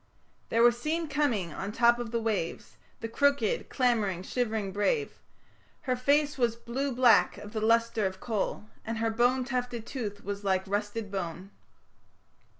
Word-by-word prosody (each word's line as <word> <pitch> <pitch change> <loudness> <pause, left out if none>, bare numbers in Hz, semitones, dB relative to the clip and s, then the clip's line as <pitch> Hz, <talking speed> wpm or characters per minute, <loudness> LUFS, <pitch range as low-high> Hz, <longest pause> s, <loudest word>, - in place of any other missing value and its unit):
There 230 +1 +3
was 240 0 +4
seen 325 +3 -1
coming 245 - 0
on 195 - -4
the 210 - -9
top 235 0 +5
of 240 -2 -4
the 235 +1 -1
waves 215 -7 -3 0.3
The 225 - -3
crooked, 280 -1 +1
clamouring, 215 -8 +1
shivering 220 -3 -2
brave... 425 - 0 0.6
Her 255 -2 0
face 285 +3 +2
was 235 -2 +2
blue 260 +4 -3
black 245 -2 +4
of 210 +1 -10
the 215 - -2
lustre 230 -1 +2
of 190 0 -7
coal, 210 -1 -2 0.2
And 225 +1 -4
her 225 0 0
bone 245 +3 +2
tufted 245 -3 -3
tooth 215 -6 -5
was 200 0 -5
like 190 -1 +1
rusted 205 +1 -3
bone. 185 0 -5
230 Hz, 160 wpm, -29 LUFS, 205-250 Hz, 0.6 s, top